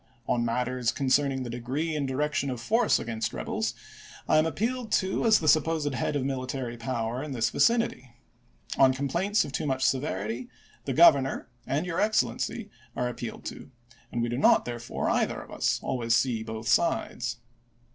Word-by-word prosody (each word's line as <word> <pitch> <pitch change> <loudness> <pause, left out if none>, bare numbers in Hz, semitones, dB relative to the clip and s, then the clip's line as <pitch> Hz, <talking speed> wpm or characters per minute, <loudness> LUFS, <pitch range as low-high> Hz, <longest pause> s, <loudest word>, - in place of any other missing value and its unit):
On 120 - +1
matters 125 +1 0
concerning 135 -1 +1
the 120 - -6
degree 135 +7 -2
and 145 -2 -1
direction 140 +1 -1
of 125 -2 -4
force 225 - +2
against 115 -1 -3
rebels, - - -2 0.5
I - - +5
am 155 - +2
appealed 230 +6 -2
to 190 +3 +1
as 220 -1 +7
the 155 - -3
supposed 155 -1 +3
head 130 +4 -1
of 135 -2 0
military 130 -2 -3
power 115 0 -3
in 150 -1 -5
this 115 -3 0
vicinity. 230 - +1 0.7
On 130 -1 +6
complaints 170 +11 0
of - - -7
too 140 - -2
much 130 -1 0
severity, 120 -3 -1 0.4
the 135 - -1
Governor 140 -3 +5 0.2
and 150 +5 0
Your 170 -2 -1
Excellency 205 - 0 0.2
are 125 - 0
appealed 120 -1 -7
to, - - -7 0.4
and 120 - -1
we 120 - -1
do 120 +2 -2
not, - - +5
therefore, 120 0 -4
either - - +1
of - - -11
us, - - 0
always 115 -2 0
see 120 -3 +1
both 110 0 -6
sides. 125 -4 +1
130 Hz, 170 wpm, -27 LUFS, 120-155 Hz, 0.7 s, as